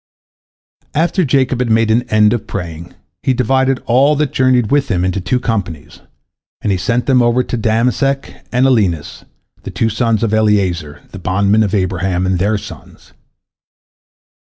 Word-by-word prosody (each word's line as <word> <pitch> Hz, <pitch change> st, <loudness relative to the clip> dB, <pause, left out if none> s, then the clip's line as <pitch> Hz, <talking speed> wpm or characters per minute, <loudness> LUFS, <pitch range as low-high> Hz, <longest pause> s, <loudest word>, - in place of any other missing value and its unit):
After 170 Hz, +4 st, +1 dB
Jacob 130 Hz, -3 st, +1 dB
had 125 Hz, -2 st, -1 dB
made 110 Hz, 0 st, +2 dB
an 120 Hz, +2 st, 0 dB
end 105 Hz, 0 st, +3 dB
of 120 Hz, -, -4 dB
praying, 85 Hz, -3 st, -7 dB, 0.3 s
he 130 Hz, -, 0 dB
divided 130 Hz, +1 st, +1 dB
all 135 Hz, +5 st, +3 dB
that 150 Hz, -1 st, -1 dB
journeyed 130 Hz, -3 st, +2 dB
with 145 Hz, -1 st, +2 dB
him 90 Hz, -3 st, 0 dB
into 95 Hz, +1 st, -1 dB
two 125 Hz, +8 st, 0 dB
companies, 90 Hz, -11 st, -4 dB, 0.6 s
and 105 Hz, -, -1 dB
he 95 Hz, -, +1 dB
set 120 Hz, +6 st, -1 dB
over 125 Hz, -2 st, +3 dB
them 120 Hz, -2 st, -4 dB
Damesek 125 Hz, +5 st, -1 dB
and 125 Hz, +2 st, +2 dB
Alinus, 100 Hz, -, 0 dB, 0.4 s
the -, -, -8 dB
two 115 Hz, -2 st, -1 dB
sons 115 Hz, 0 st, 0 dB
of 110 Hz, -2 st, 0 dB
Eliezer, 95 Hz, -8 st, 0 dB
the 100 Hz, -, -9 dB
bondman 100 Hz, +4 st, +1 dB
of 105 Hz, -1 st, 0 dB
Abraham, 95 Hz, -1 st, -1 dB
and 95 Hz, -1 st, 0 dB
their 105 Hz, +3 st, +1 dB
sons. -, -, -12 dB
110 Hz, 155 wpm, -15 LUFS, 95-125 Hz, 0.6 s, end